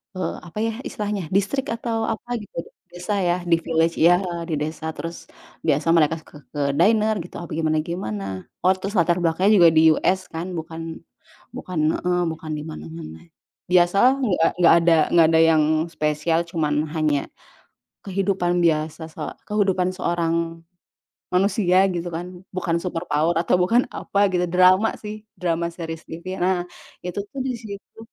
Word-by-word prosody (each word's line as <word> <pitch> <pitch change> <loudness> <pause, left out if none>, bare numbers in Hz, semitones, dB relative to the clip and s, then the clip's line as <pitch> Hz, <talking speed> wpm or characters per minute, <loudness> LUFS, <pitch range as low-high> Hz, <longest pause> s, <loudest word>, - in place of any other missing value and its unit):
eee, 185 - -3
apa 170 - -12
ya 225 - 0 0.2
istilahnya 205 -3 -3
distrik 205 +9 0
atau 225 -1 -2
apa 235 +2 -3
gitu, 205 - -13 0.3
desa 175 +4 -4
ya, 175 -2 +2
di 170 -1 +3
village 165 0 0
ya, 175 +2 +6 0.3
di 155 - 0
desa. 155 +1 -4
Terus 165 +1 -7 0.4
biasa 150 +1 +1
mereka 165 -1 +4
ke - - -19 0.2
ke 145 - -1 0.2
dinner 215 +3 +4
gitu 175 +1 -9
apa 170 - -8
gimana 155 -1 +1
gimana. 155 - -4 0.4
Oh, 185 - +5
terus 200 +3 -5
latar 175 +1 +3
belakangnya 175 +4 +2
juga 170 -1 +8
di 160 0 +7
US 185 +4 +1
kan, 175 +3 -4
bukan 160 0 -6 0.7
bukan 180 -3 -5 0.2
heeh, 180 0 0
bukan 160 0 -7
di 150 - -6
mana-mana. 160 - -8 0.5
Biasalah 185 +8 +5
nggak 180 -8 +2
nggak - - +8
ada 170 0 +4 0.2
nggak 165 -2 +6
ada - - +6
yang 155 -1 +4 0.3
spesial, 155 +2 0
cuma 160 -3 -1 0.3
hanya 150 -3 +1 0.8
kehidupan 190 -2 0
biasa 160 0 0
se - - -10 0.3
kehidupan 190 -3 +1
seorang 170 -2 -1 0.7
manusia 185 0 +3
gitu 175 -2 -3
kan, 175 +2 -7
bukan 175 -2 0
superpower 170 -2 -1
atau 170 - +2
bukan 230 +8 +3
apa 200 0 +1
gitu. 180 -1 +1
Drama 185 +4 +4
sih, 215 0 -8 0.2
drama 170 -1 0
series 165 -1 -7
TV 175 +4 -6
nah, 180 -1 +1 0.4
itu 180 +2 -4
tuh 275 - -6
di 260 -1 -2
situ 205 -1 -10
175 Hz, 155 wpm, -23 LUFS, 165-190 Hz, 0.8 s, juga